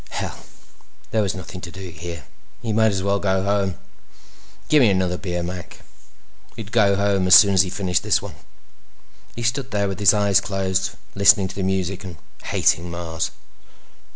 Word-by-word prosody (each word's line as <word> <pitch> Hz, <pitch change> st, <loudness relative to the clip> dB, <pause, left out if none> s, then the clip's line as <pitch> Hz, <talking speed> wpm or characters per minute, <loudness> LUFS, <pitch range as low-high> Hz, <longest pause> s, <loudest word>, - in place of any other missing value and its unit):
Hell! -, -, -6 dB, 0.7 s
There 110 Hz, -, +1 dB
was 100 Hz, -2 st, -1 dB
nothing 90 Hz, 0 st, -8 dB
to 85 Hz, -, -7 dB
do 95 Hz, +1 st, -9 dB
here. 85 Hz, -2 st, -8 dB, 0.4 s
He 115 Hz, -2 st, -2 dB
might 110 Hz, 0 st, +3 dB
as 95 Hz, -1 st, -2 dB
well 100 Hz, 0 st, +1 dB
go 95 Hz, -1 st, 0 dB
home. 100 Hz, -2 st, 0 dB, 0.9 s
"Gimme 140 Hz, -7 st, +5 dB
another 95 Hz, -2 st, 0 dB
beer, 90 Hz, -1 st, -4 dB
Mac." 90 Hz, 0 st, -7 dB, 0.7 s
He'd 110 Hz, -3 st, -9 dB
go 105 Hz, -4 st, +3 dB
home 100 Hz, -2 st, +1 dB
as 90 Hz, -, +8 dB
soon 100 Hz, -2 st, +7 dB
as 95 Hz, -, +6 dB
he 95 Hz, -, -1 dB
finished 95 Hz, -2 st, -1 dB
this -, -, +2 dB
one. -, -, -9 dB, 1.0 s
He 120 Hz, -, -5 dB
stood 125 Hz, +3 st, -1 dB
there 100 Hz, -3 st, 0 dB
with 95 Hz, -2 st, -5 dB
his 100 Hz, -4 st, +6 dB
eyes 100 Hz, -1 st, +3 dB
closed, 95 Hz, -2 st, -1 dB, 0.2 s
listening 100 Hz, -1 st, +5 dB
to -, -, -9 dB
the 100 Hz, -, -3 dB
music 95 Hz, 0 st, -2 dB
and 90 Hz, -2 st, -8 dB, 0.3 s
hating 85 Hz, +2 st, +1 dB
Mars. 85 Hz, -1 st, -3 dB
95 Hz, 175 wpm, -22 LUFS, 90-100 Hz, 1.0 s, as